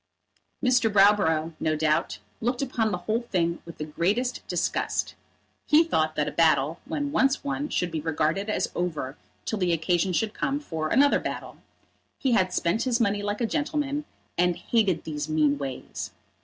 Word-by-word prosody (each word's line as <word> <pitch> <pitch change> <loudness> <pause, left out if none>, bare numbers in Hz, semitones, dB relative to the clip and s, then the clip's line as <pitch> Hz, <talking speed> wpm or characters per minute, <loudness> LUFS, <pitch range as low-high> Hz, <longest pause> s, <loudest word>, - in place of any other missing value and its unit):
Mr. 250 -3 +3
Browborough, 195 -6 +4
no 155 0 +1
doubt, 155 0 +1 0.2
looked 245 +3 -1
upon 230 -5 0
the 180 - -1
whole 220 +2 +1
thing 170 -7 -1
with 170 - -10
the 150 - -4
greatest 205 +11 0
disgust. - - -1 0.5
He 305 +2 +6
thought 155 - 0
that 150 - 0
a - - -2
battle 160 -1 +2
when 290 0 -2
once 270 -1 +2
won 285 +1 -2
should 175 -1 -1
be 160 -1 -2
regarded 160 +6 0
as - - 0
over 155 -6 -3 0.3
till 220 - -2
the 180 -2 +2
occasion 175 +3 +1
should 210 +4 0
come 275 +1 -1
for 160 - -3
another 280 - +4
battle. - - -5 0.6
He 265 - 0
had 185 -5 +3
spent 175 +7 0
his 250 -2 +1
money 205 -3 +1
like 205 +2 -2
a - - +3
gentleman, 295 +2 -1 0.3
and 180 0 +3
hated 200 -7 +1
these 150 -1 -4
mean 150 -2 +2
ways. 135 -2 -5
195 Hz, 170 wpm, -26 LUFS, 160-245 Hz, 0.6 s, He